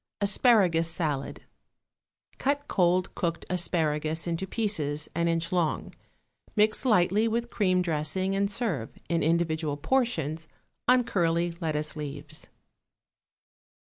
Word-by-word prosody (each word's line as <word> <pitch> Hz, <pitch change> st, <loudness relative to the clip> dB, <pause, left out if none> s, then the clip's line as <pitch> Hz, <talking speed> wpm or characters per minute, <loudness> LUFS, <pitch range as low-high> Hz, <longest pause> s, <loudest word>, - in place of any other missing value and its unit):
=Asparagus 195 Hz, -5 st, +3 dB
Salad.= 150 Hz, -5 st, -2 dB, 1.0 s
Cut 285 Hz, +1 st, -1 dB
cold 180 Hz, -1 st, +1 dB
cooked 170 Hz, -1 st, -3 dB
asparagus 160 Hz, -3 st, 0 dB
into 170 Hz, +2 st, -2 dB
pieces 155 Hz, -9 st, -1 dB
an 170 Hz, +1 st, 0 dB
inch 165 Hz, 0 st, 0 dB
long, 175 Hz, -4 st, -1 dB, 0.6 s
mix 215 Hz, +4 st, +3 dB
lightly 210 Hz, -1 st, +3 dB
with 235 Hz, +1 st, -2 dB
cream 185 Hz, -4 st, +1 dB
dressing 175 Hz, +4 st, 0 dB
and 200 Hz, 0 st, +1 dB
serve, 195 Hz, -, -2 dB
in 170 Hz, -1 st, +1 dB
individual 160 Hz, -2 st, 0 dB
portions, 160 Hz, -, -1 dB, 0.4 s
on 250 Hz, 0 st, +5 dB
curly 170 Hz, -4 st, 0 dB
lettuce 155 Hz, -2 st, -1 dB
leaves. 150 Hz, 0 st, -7 dB
170 Hz, 110 wpm, -27 LUFS, 155-200 Hz, 1.0 s, on